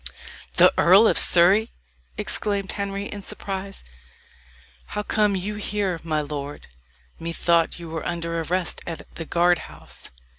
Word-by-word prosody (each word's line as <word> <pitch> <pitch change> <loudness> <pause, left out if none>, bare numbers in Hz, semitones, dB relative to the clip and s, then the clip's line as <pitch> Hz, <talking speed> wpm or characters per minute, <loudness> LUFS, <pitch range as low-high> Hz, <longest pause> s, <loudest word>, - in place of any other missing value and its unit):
"The - - +6
Earl 190 +6 +7
of - - +2
Surrey!" 190 +6 +5 0.5
exclaimed 200 -2 -1
Henry, 200 0 -4
in 205 0 -7
surprise. 195 0 -7 1.0
"How 210 - -4
come 210 -1 +1
you 205 +3 -4
here, 200 -4 -2
my 155 -2 -1
lord? 145 -1 -6 0.5
Methought 170 0 +1
you 170 -1 -9
were 160 -1 -5
under 170 -1 -3
arrest 180 +2 -1
at 165 -3 -5
the 165 - -7
guard 175 +1 +2
house." 75 +1 -12
175 Hz, 135 wpm, -23 LUFS, 165-200 Hz, 1.0 s, Earl